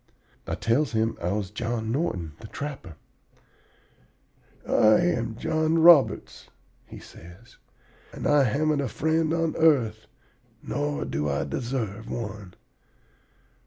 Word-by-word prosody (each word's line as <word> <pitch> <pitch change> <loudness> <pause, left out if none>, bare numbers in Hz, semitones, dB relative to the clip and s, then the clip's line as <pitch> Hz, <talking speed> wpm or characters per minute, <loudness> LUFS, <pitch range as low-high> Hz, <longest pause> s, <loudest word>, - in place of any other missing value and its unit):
"I - - -2
tells 125 +5 0
him 110 0 0
I 85 +1 -1
was 100 -2 -3
John 115 0 -3
Norton, 105 - -2
the 110 - -10
trapper. 135 - -7 1.7
"'I 110 0 +5
am 120 -10 0
John 160 +4 0
Roberts,' 165 -4 +4 0.4
he - - -11
says, 85 +8 -15 0.5
'and - - -7
I 145 -2 +4
haven't 145 +4 +1
a 140 - -2
friend 160 +5 0
on 165 -1 0
the - - -7
earth, 120 -9 +2 0.6
nor 145 0 -2
do 75 0 -2
I 70 0 -1
deserve 115 - -4
one. 105 -5 -6
120 Hz, 125 wpm, -25 LUFS, 105-150 Hz, 1.7 s, I